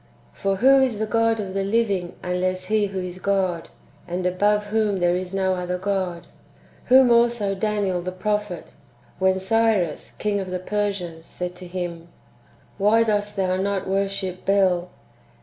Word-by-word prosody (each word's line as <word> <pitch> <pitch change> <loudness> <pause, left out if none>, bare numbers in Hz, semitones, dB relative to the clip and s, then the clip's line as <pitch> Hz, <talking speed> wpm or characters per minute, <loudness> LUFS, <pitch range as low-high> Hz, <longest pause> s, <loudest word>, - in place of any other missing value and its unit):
For 195 0 -1
who 270 +6 +5
is 255 -5 +1
the 220 - -1
God 225 0 +1
of 195 -3 -4
the 195 0 -1
living 200 -4 0
unless 185 0 -1
He 215 0 +1
who 195 -1 -6
is 180 0 -6
God, 185 -3 0 0.4
and 180 +1 -3
above 205 +3 +2
whom 210 -2 0
there 175 0 +2
is 180 0 -4
no 190 -1 +1
other 180 0 -2
God? 185 -3 -2 0.6
Whom 255 -1 +6
also 235 -4 +3
Daniel 200 -3 -1
the 180 +1 -4
prophet, 210 -1 -3 0.5
when 190 0 +3
Cyrus 195 -4 +1
king 205 -1 -2
of 190 -1 -4
the 180 - -2
Persians 185 -4 -3
said 180 0 -5
to 180 - -9
him, 175 -2 -5 0.7
"Why 215 +3 +4
dost 210 -1 -1
thou 185 -2 0
not 195 0 -1
worship 195 -1 -2
Bel?" 185 -3 +2
195 Hz, 160 wpm, -23 LUFS, 180-210 Hz, 0.7 s, Whom